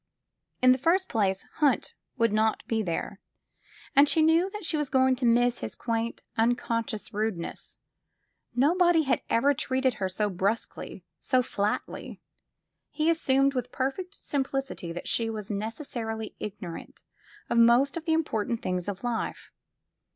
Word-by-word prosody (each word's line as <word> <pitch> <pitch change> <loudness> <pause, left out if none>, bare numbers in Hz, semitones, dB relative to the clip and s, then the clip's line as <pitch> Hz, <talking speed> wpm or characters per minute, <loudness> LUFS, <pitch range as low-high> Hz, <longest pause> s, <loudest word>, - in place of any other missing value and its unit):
In 255 - +8
the 255 - +3
first 355 +7 +2
place. 195 -3 0
Hunt 295 -3 +2 0.2
would 230 -3 +2
not 220 +1 +1
be 225 -1 0
there, 170 -5 -3 0.8
and 285 +1 +7
she 320 - +4
knew 330 +4 +4
that 420 -1 -6
she 325 - +1
was 295 -3 -1
going 260 -1 +4
to 245 -1 +1
miss 240 +1 +3
his - - -5
quaint, 230 0 -2
unconscious 230 -2 -1
rudeness. 210 -5 -4 0.8
Nobody 335 +5 +4
had 270 - +1
ever 280 +5 +3
treated 260 -1 0
her 190 - +1
so 210 +3 0
brusquely, 200 +4 -3
so 255 -2 +2
flatly. 205 -4 -3 0.7
He 315 +2 +1
assumed 275 -4 +2
with 250 -1 -3
perfect 355 +9 -3
simplicity 270 - -3
that 175 - -6
she 230 -1 +1
was 215 -2 -5
necessarily 225 0 -4
ignorant 195 -5 -7 0.4
of 235 - +2
most 240 +4 +5
of 330 -1 -5
the 325 - +2
important 235 -8 -1
things 180 0 -2
of 200 0 -5
life. 240 -2 -3
245 Hz, 145 wpm, -28 LUFS, 220-280 Hz, 0.8 s, In